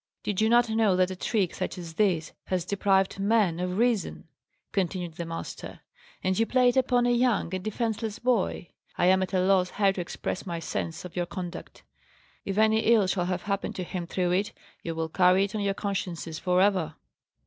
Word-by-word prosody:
"Did 205 -1 -1
you 220 - +3
not 240 +1 +5
know 220 -3 +2
that 185 0 +2
a - - -4
trick, 190 -1 0
such - - -4
as 170 -2 -7
this, 175 -4 +1
has 180 -2 -1
deprived 195 0 +1
men 200 -4 +2
of 180 +1 -2
reason?" 230 -7 0 0.4
continued 180 -3 -2
the 170 +1 -6
master. 165 0 -7 0.4
"And 185 +1 +1
you 225 - +2
play 250 -1 +4
it 245 - -1
upon 250 -2 +3
a 245 - +3
young 240 -7 +1
and 185 -1 -3
defenceless 220 0 -2
boy! 235 -7 0 0.3
I - - +2
am 190 +1 +5
at 185 - -2
a 190 - +1
loss 185 -1 +3
how 200 0 +2
to 190 - -4
express 175 +1 -4
my 170 -3 -4
sense 165 0 -4
of 180 - -10
your 175 -1 -1
conduct. 180 -2 -7 0.6
If 195 0 -3
any 220 0 +4
ill 220 -2 +4
shall 185 -1 0
have 180 0 -2
happened 200 -1 -2
to 185 - -3
him 175 -1 -5
through 180 0 0
it, 195 +3 0 0.3
you 165 -1 -4
will 160 0 -2
carry 180 +3 +4
it 200 +1 -3
on 215 - -2
your 200 -1 0
consciences 180 -6 -4
for 180 0 +2
ever." 185 -7 +1
190 Hz, 205 wpm, -27 LUFS, 180-215 Hz, 0.6 s, not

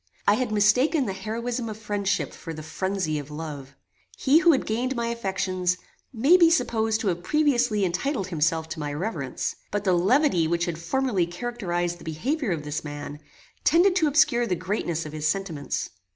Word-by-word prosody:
I 205 - +7
had 245 +1 -1
mistaken 250 +8 +3
the 195 - -2
heroism 230 +4 -3
of 215 - -6
friendship 205 -2 -1
for 165 -1 -8
the 155 - -7
phrenzy 185 -2 -2
of 145 0 -8
love. 150 -3 -7 0.4
He 285 +4 +4
who 345 -1 +6
had 275 - +1
gained 245 +4 -1
my 235 -1 -1
affections, 185 -5 -1 0.3
may 270 +9 +5
be 340 -2 +6
supposed 225 -7 +1
to 205 - +1
have 175 -1 -2
previously 245 -5 +2
entitled 195 - -1
himself 160 -1 0
to 160 - -5
my 145 -1 -3
reverence; 155 - -3
but 205 0 -2
the 190 -2 +3
levity 185 - +3
which 170 +1 0
had 170 -3 -4
formerly 195 0 0
characterized 175 -4 -3
the - - -13
behaviour 245 - -2
of 165 -5 -2
this 150 +1 -4
man, 145 0 -7 0.4
tended 360 +3 +4
to 320 -4 +3
obscure 285 -5 +3
the 185 - 0
greatness 170 -4 -2
of 155 - -8
his 155 0 -1
sentiments. 165 -5 -2
195 Hz, 180 wpm, -25 LUFS, 170-245 Hz, 0.4 s, I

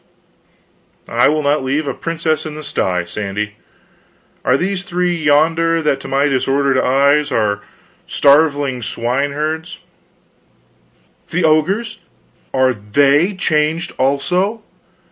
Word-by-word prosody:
"I - - +3
will 155 0 +1
not 145 -1 +1
leave 140 +3 -1
a 135 - -1
princess 160 -1 -2
in 155 -1 -7
the 155 - -8
sty, 90 -9 -1
Sandy. 105 +3 -5 0.9
Are 125 - +3
those 185 +4 -2
three 180 -1 -1
yonder 165 +2 +2
that 150 -4 0
to - - -9
my 140 +2 +1
disordered 135 0 +1
eyes 140 +3 +2
are 105 -4 0 0.5
starveling 140 -3 +2
swine 125 +5 -2
herds 160 +4 -3 0.8
" - - -38
"The 175 +2 -1
ogres, 165 +9 +1 0.5
Are 130 -1 +2
they 140 - +2
changed 160 -1 0
also? 180 +11 0
145 Hz, 120 wpm, -17 LUFS, 130-160 Hz, 0.9 s, I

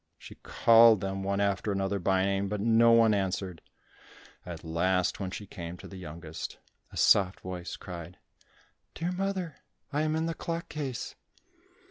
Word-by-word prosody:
She - - -12
called 115 -2 +6
them 95 0 -3
one 100 +1 -1
after 100 +1 0
another 100 0 -1
by 95 +1 +2
name, 100 0 0
but 105 0 -2
no 115 +2 +5
one 115 -2 +6
answered. 95 -3 -2 0.9
At - - -7
last, 90 +3 0
when 95 -2 -3
she 105 +2 -7
came 85 -2 -7
to - - -11
the 95 - -11
youngest, 80 -2 -7 0.3
a - - -9
soft 95 -1 +4
voice 90 -1 -6
cried, 85 -1 -8 0.8
"Dear 170 +2 -2
mother, 185 -3 -3 0.4
I 145 - +1
am 155 0 0
in 160 0 0
the 165 - -1
clock 165 +1 -4
case." 140 -6 -4
100 Hz, 160 wpm, -29 LUFS, 90-115 Hz, 0.9 s, called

